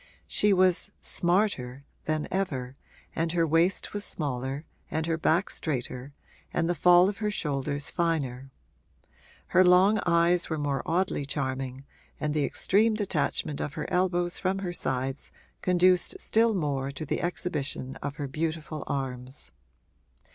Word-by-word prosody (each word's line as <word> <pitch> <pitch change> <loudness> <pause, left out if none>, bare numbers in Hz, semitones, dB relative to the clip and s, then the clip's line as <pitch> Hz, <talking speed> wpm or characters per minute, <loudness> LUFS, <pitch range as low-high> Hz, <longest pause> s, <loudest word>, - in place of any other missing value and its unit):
She 210 - +2
was 185 -2 +3
'smarter' 170 -8 0 0.2
than 155 -1 -1
ever 135 -10 -2 0.4
and 165 0 0
her 170 -1 +3
waist 165 +4 +1
was 205 0 -2
smaller 135 -3 -3 0.2
and 160 0 -1
her 165 0 0
back 165 +3 +1
straighter 130 -2 -3 0.4
and 165 - 0
the 175 - +2
fall 175 +2 +6
of 200 +1 -3
her 210 -1 0
shoulders 145 -5 -2
finer; 140 -7 -1 1.0
her 185 - +6
long 185 +4 +5
eyes 170 +1 +3
were 160 - -1
more 145 -2 -1
oddly 175 -2 0
charming 135 -1 -3 0.3
and 150 -1 -1
the 150 -2 +1
extreme 215 +3 +2
detachment 175 -7 -1
of 145 - -3
her - - -3
elbows 175 -1 +1
from 190 0 0
her 185 -3 -3
sides 135 -3 -1 0.3
conduced 180 0 +3
still 225 0 +3
more 140 -6 -1
to 140 +3 -6
the - - -2
exhibition 145 -7 -2
of 145 - -5
her 145 - -4
beautiful 155 +1 -3
arms. 130 -1 -5
160 Hz, 140 wpm, -28 LUFS, 140-180 Hz, 1.0 s, fall